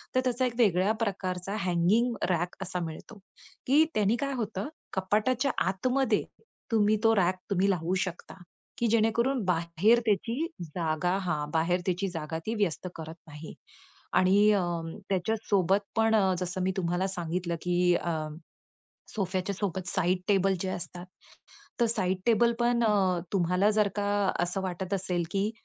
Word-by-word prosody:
तर 255 - +4
त्याचा 255 0 +1
एक 245 - -1
वेगळ्या 195 -3 +3
प्रकारचा 190 -1 -3
हगिंग 185 +8 +2 0.2
रॅक 175 0 0
असा 185 -1 -4
मिळतो, 165 +7 -9 0.5
की 285 +5 +6
त्यानी 210 +1 +3
काय 275 - -3
होतं, 205 +2 -4 0.2
कपाटाच्या 215 +8 +1 0.2
आतमध्ये 245 +4 +1 0.5
तुम्ही 215 -1 +3
तो 225 0 +5
रॅक 185 -1 +3 0.2
तुम्ही 195 +1 +2
लावू 180 0 -1
शकता, 175 -2 -8 0.4
की 235 - +2
जेणेकरून 230 +4 +2
बाहेर 175 +6 +3
त्याची 230 - 0 0.2
जागा 165 +2 -1
हां, 155 -5 -2
बाहेर 165 +3 +1
त्याची 185 +2 0
जागा 160 -2 -4 0.2
व्यस्त 185 -3 -1
करत 160 0 -7
नाही 150 +1 -9 0.6
आणि 200 +3 +5
अ, 200 - +2 0.5
त्याच्यासोबत 195 0 +1 0.2
पण 225 0 +3 0.2
जसं 180 0 -3
मी 190 - +1
तुम्हाला 175 +1 0
सांगितलं, 175 -1 -3
की 180 0 +2
अ, 170 - -1 1.0
सोफ्याच्या 190 -1 -1
सोबत 190 -2 -3
साइड 185 -1 +1
टेबल 195 -1 +3
जे 190 - -2
असतात, 175 -1 -6 0.8
तर 235 - +5
साइड 190 -5 0
टेबल 235 0 +4
पण 240 0 +2
अ, 195 -4 +2 0.2
तुम्हाला 180 +2 +3
जर 210 -1 +4
का 205 -1 0 0.3
असं 175 +2 -1
वाटत 185 +1 -3
असेल, 185 -2 -1
की 200 +2 0
190 Hz, 145 wpm, -28 LUFS, 175-215 Hz, 1.0 s, की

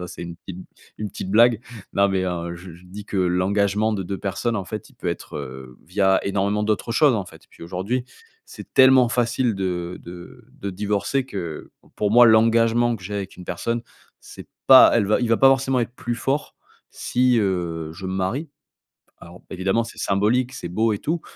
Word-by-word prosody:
Ça - - -9
c'est - - -8
une 85 0 -7
petite 90 -1 -10 0.4
une 105 -1 -4
petite 95 0 -7
blague. 115 +1 +5 0.4
Non 100 0 +4
mais 95 -1 0
en 85 -1 -4
je 90 0 -11
je 90 +2 -17
dis 100 +3 -10
que 100 - -5
l'engagement 100 +4 +1
de 95 - -3
2 95 +2 -5
personnes 110 +4 -2
en 95 - -3
fait, 105 +1 -7
il - - -23
peut - - -9
être, - - -5
heu, 65 -1 -9
via, 95 +1 +2
énormément 100 +1 0
d'autres 110 +2 -1
choses, 145 -3 +4
en 100 -4 -2
fait. 80 -2 -16
Puis - - -17
aujourd'hui, 95 +9 -3 0.4
c'est - - -13
tellement 130 -2 +6
facile 120 -1 0
de 90 -2 -3
de 85 0 -12 0.2
de 100 - -4
divorcer 105 +7 -1
que, 90 -10 -7 0.3
pour 105 -1 0
moi 120 +1 +7
l'engagement 115 +1 +4
que 100 - -10
j'ai 105 +3 -6
avec 100 -1 -5
une 90 - -10
personne, 115 +7 -2 0.4
c'est - - -12 0.2
pas 130 -1 +9
elle 105 -4 +2
va 105 - +2
il 120 - 0
va 115 - +3
pas 135 - +7
forcément 135 -1 +2
être 120 +1 -4
plus 120 -1 -4
fort, 135 +5 -2 0.4
si, 125 -1 +1
heu, 85 -5 -2
je 95 +3 -10
me 95 - -3
marie. 105 - -2 0.7
Alors 85 +2 -14
évidemment, 95 +5 0
c'est - - -12
symbolique, 115 +6 +1
c'est 85 - -6
beau 110 +5 0
et 105 - -1
tout, 165 +1 -2
100 Hz, 200 wpm, -22 LUFS, 90-115 Hz, 0.7 s, pas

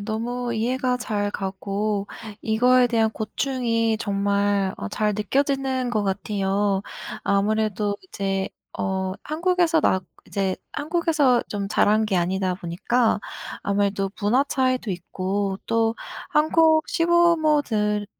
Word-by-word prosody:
너무 235 +3 -3
이해가 250 +3 0
잘 205 -4 -2
가고 200 +1 -2 0.4
이거에 245 +3 +4
대한 225 -2 +2
고충이 230 -1 -1
정말 200 -1 +1
어, 100 - -5
잘 210 - 0
느껴지는 265 +3 0
것 215 -3 0
같아요. 195 0 0 0.4
아무래도 205 0 +1
이제 195 - -2 0.3
어, 190 0 -1
한국에서 335 +1 +2
나 190 - +2 0.3
이제 195 -2 -1 0.2
한국에서 305 -5 +2
좀 200 -1 -3
자란 215 +1 +3
게 195 -3 0
아니다 185 +1 0
보니까 205 +7 0 0.4
아무래도 200 -1 0
문화 225 +7 +3
차이도 255 -5 0
있고 190 +2 -2
또 225 0 +2 0.4
한국 315 +1 +4
시부모들 305 -12 +2
215 Hz, 245 characters per minute, -24 LUFS, 200-255 Hz, 0.4 s, 이거에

